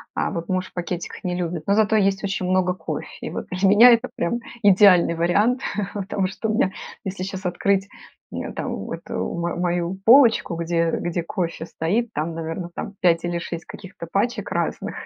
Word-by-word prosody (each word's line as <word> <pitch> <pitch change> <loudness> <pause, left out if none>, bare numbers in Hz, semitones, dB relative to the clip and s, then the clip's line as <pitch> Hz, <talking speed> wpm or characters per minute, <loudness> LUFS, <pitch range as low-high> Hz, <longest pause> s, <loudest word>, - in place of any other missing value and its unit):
а, - - 0
вот 170 0 -4
муж 185 0 -1
в - - -21
пакетиках 175 0 -5
не 180 -1 -1
любит. 170 -2 -3
Но 200 - +3
зато 220 +1 +3
есть 195 0 +1
очень 195 -2 -2
много 185 0 +2
кофе. - - -5 0.2
И - - -3
вот - - -5
для 185 +2 +1
меня 210 +5 +8
это 235 +2 +3
прям 235 +8 -1 0.2
идеальный 190 -4 +6
вариант. 205 +10 +2 0.3
Потому 195 -1 -1
что 210 +3 -4
у 220 - 0
меня, 190 -3 +2 0.3
если 190 -1 -4
сейчас 190 0 -6
открыть, 195 +2 0 0.4
э, - - -5
там, - - -5
эту - - -7
м 170 0 -2
мою 175 0 -1
полочку, 230 -7 +6
где 165 0 0
где 175 -1 -2
кофе 170 -2 -3
стоит, 210 +9 -1
там, 160 +2 -3
наверно, 165 +2 -4
там - - -5
5 170 -2 +3
или 175 0 -1
6 170 0 -6
каких-то 190 -4 -10
пачек 235 +5 -1
разных. - - -2
185 Hz, 185 wpm, -23 LUFS, 170-200 Hz, 0.4 s, меня